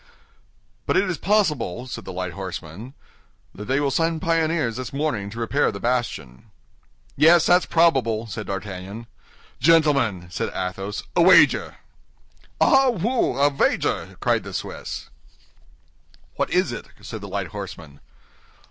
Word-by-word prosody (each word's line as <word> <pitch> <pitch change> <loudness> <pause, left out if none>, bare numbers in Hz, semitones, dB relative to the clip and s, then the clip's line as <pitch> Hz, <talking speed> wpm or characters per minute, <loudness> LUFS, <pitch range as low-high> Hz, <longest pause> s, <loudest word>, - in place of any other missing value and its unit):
"But - - +2
it 200 - +2
is 180 -3 -3
probable," 150 - 0
said 115 -5 -7
the - - -6
light 90 -1 -4
horseman, 95 - -7 0.6
"that 105 - -8
they 135 +4 +1
will 140 -1 0
send 165 +2 0
pioneers 160 -7 0
this 130 -3 -5
morning 135 -9 -2
to 115 +3 -8
repair 125 +5 +1
the 100 - -7
bastion." 115 - -3 0.7
"Yes, 165 +3 +6
that's 180 +1 +4
probable," 135 -10 +2
said 110 -1 -6
D'Artagnan. 100 +3 -6 0.5
"Gentlemen," 140 - +3
said - - -2
Athos, 95 +2 -4
"a 175 - +4
wager!" 185 +2 +5 0.8
"Ah, 270 -3 +5
wooi, 205 - +1
a 145 - +3
vager!" 135 - 0
cried - - +1
the - - -9
Swiss. - - -6 1.2
"What - - -1
is - - +1
it?" - - -7 0.2
said 110 - -7
the 100 - -7
light 95 -2 -3
horseman. 85 -7 -9
120 Hz, 140 wpm, -23 LUFS, 100-160 Hz, 1.2 s, Yes